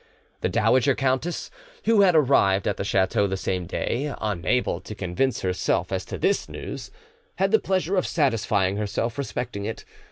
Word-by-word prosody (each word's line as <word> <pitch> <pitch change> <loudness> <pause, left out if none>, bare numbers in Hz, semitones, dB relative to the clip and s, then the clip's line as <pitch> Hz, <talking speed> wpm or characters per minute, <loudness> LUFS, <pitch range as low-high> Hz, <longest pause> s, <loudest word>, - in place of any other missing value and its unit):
The - - 0
dowager 125 +4 +3
countess, 135 +5 -1 0.3
who 225 -2 +5
had 185 -4 +5
arrived 115 -10 +4
at 100 - 0
the - - -2
chateau 100 +1 +2
the 95 0 -2
same 90 -2 -2
day, 135 - -2
unable 105 -1 0
to 105 - -8
convince 100 +7 -1
herself 90 -1 0
as 95 -1 -2
to - - -6
this 200 - 0
news, - - -7 0.5
had - - +1
the 440 - +5
pleasure 190 0 0
of 185 - +1
satisfying 105 - +1
her 105 0 -1
self 115 +6 -2
respecting 125 -6 -4
it. 110 - -5
115 Hz, 170 wpm, -25 LUFS, 95-140 Hz, 0.5 s, who